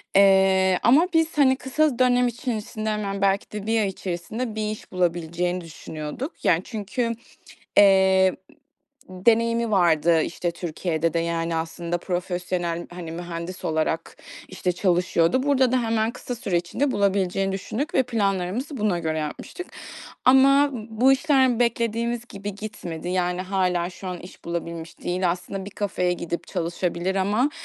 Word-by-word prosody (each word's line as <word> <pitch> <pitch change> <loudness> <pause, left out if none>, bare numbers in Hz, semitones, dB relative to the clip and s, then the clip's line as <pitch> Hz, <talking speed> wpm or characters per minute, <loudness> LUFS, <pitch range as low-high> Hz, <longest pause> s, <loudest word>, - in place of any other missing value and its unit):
Eee, 190 -1 +5
ama 280 - +5
biz, 325 -1 +2
hani, 265 -2 +5
kısa 265 0 0
dönem 250 -1 +4
içerisinde 225 -2 -3
hemen 200 -2 -2
belki 195 0 +1
de 210 -1 -5
1 225 0 +2
ay 205 - +1
içerisinde 195 +5 -4
bir 215 -1 -1
iş 215 - -9
bulabileceğini 175 0 -1
düşünüyorduk. 155 - -6 0.2
Yani, 165 0 +4
çünkü, 230 +3 -3 0.7
eee, 190 -2 +6 0.7
deneyimi 230 +4 +2
vardı, 170 -4 +4
işte, 175 +1 -2
Türkiye'de 165 -1 -2
de, - - +2
yani, 165 0 -1
aslında 170 +1 -3
profesyonel, 175 -1 -3
hani, 175 -2 -7
mühendis 175 +1 -6
olarak, 160 +1 -1 0.3
işte, 185 -1 -2
çalışıyordu. 180 +4 +2
Burada 265 -3 +3
da 255 -1 +2
hemen 225 -1 +1
kısa 245 +1 -6
süre 195 -6 -2
içinde 175 +12 0
bulabileceğini 195 -1 +1
düşündük 215 +9 -4
ve 265 - +5
planlarımızı 210 - -1
buna 210 -6 +1
göre 160 -1 -2
yapmıştık. 155 - -6 0.6
Ama 275 +2 +6 0.2
bu 235 +4 +4
işler 265 -4 +3
beklediğimiz 235 0 0
gibi 200 0 -6
gitmedi, 180 -6 -6
yani, 180 0 0
hâlâ 180 -2 0
şu 185 +1 -8
an 180 -1 -5
iş 180 - -13
bulabilmiş 170 -1 -5
değil. 180 0 0
Aslında 190 +2 -5
bir 200 - -8
kafeye 190 -3 -1
gidip 170 -1 -4
çalışabilir 175 +1 -2
ama, 210 +9 +2
190 Hz, 140 wpm, -24 LUFS, 175-230 Hz, 0.7 s, eee